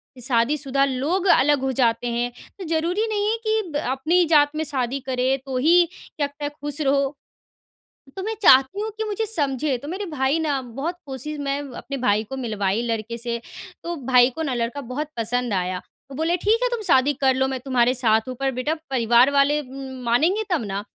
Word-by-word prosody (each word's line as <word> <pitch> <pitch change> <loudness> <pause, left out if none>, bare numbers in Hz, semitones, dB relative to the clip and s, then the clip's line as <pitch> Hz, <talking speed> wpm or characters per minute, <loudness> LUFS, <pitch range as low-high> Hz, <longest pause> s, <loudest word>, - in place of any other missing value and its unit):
कि 250 - -11
शादीशुदा 270 +3 +1
लोग 290 +9 -1
अलग 290 -3 +4
हो 265 0 0
जाते 235 -1 +2
हैं। 240 +1 -1 0.3
तो - - -5
ज़रूरी 340 +7 0
नहीं 415 0 0
है 455 - 0
कि 435 0 +2
ब - - 0
अपनी 330 +7 +2
जात 295 -2 +5
में 315 - -1
शादी 270 -2 -2
करें 260 +1 +1
तो 260 -1 -3
ही 340 +6 +5
क्या 290 -5 -5
पता 290 +1 -6
ख़ुश 295 0 -5
रहो। 275 0 +1 1.0
तो 380 - -3
मैं 445 +1 -3
चाहती 270 +5 +5
हूँ 440 - -2
कि 440 - -1
मुझे 430 +1 -2
समझे, 285 - 0
तो 285 - -10
मेरे 385 +5 -4
भाई 295 -1 0
ना 290 -4 0
बहुत 275 +9 -5
कोशिश 280 +3 -6
मैं 280 0 -1 0.2
अपने 275 0 -6
भाई 215 -4 +1
को 265 +5 -7
मिलवाई 215 -3 -1
लड़के 230 +1 -3
से, 235 0 -4 0.4
तो 345 0 -3
भाई 250 -1 +5
को 320 - -4
ना 270 -4 -1
लड़का 240 +4 -2
बहुत 270 +5 -4
पसंद 240 0 -1
आया। 185 0 -1 0.3
वो - - -7
बोले, 325 +3 +1
"ठीक 435 +6 +2
है - - +2
तुम 475 -2 -3
शादी 265 +3 +4
कर 265 -1 +2
लो, 265 0 +1
मैं 265 -1 -3
तुम्हारे 250 -1 +2
साथ 225 -2 +2
हूँ 255 - -5
पर 270 -1 0
बेटा, 255 +5 -1 0.2
परिवार 240 +1 +4
वाले 285 +1 +3
उम, 265 -1 -9
मानेंगे 330 - +2
तब 315 -10 +1
ना।" 200 +1 -4
270 Hz, 205 wpm, -23 LUFS, 250-310 Hz, 1.0 s, जात